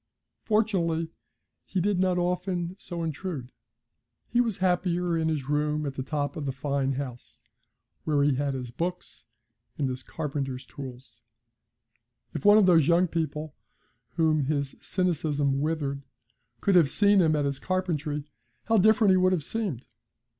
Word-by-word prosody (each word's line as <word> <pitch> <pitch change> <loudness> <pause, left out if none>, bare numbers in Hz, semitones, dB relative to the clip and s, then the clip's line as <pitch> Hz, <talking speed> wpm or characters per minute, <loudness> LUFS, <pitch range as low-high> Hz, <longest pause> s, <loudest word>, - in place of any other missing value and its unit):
Fortunately, 175 -7 +1 0.5
he 190 - -2
did 195 +1 +1
not 185 -1 +2
often 180 0 -1
so 170 -2 -5
intrude; 155 -5 -4 0.8
he 240 - +2
was 230 -5 -1
happier 180 -1 +1
in 160 -1 0
his 145 -4 -2
room 150 +1 0
at 140 - -3
the 135 - -4
top 145 +3 -2
of 150 -4 -4
the - - 0
fine 135 0 -1
house, 125 - -7 0.6
where 145 -2 +2
he 145 0 +3
had 140 +1 -1
his 125 -2 -5
books 180 +7 -5 0.5
and 140 - 0
his 130 0 -4
carpenter's 135 -4 -4
tools. 130 -2 -10 1.1
If - - -4
one 205 +1 +7
of 210 - +6
those 165 -5 +5
young 175 +2 +4
people 155 -2 -3 0.6
whom 155 -4 +2
his 140 -1 -1
cynicism 150 -6 0
withered 145 -3 -1 0.6
could 200 - +2
have 170 -6 +6
seen 205 +2 +4
him 160 -2 +3
at 145 -1 +1
his 140 -1 -2
carpentry, 165 -6 -2 0.4
how 225 0 +2
different 215 0 +5
he 185 - +5
would 185 0 +3
have 165 -5 0
seemed! 195 - -3
160 Hz, 155 wpm, -27 LUFS, 140-180 Hz, 1.1 s, one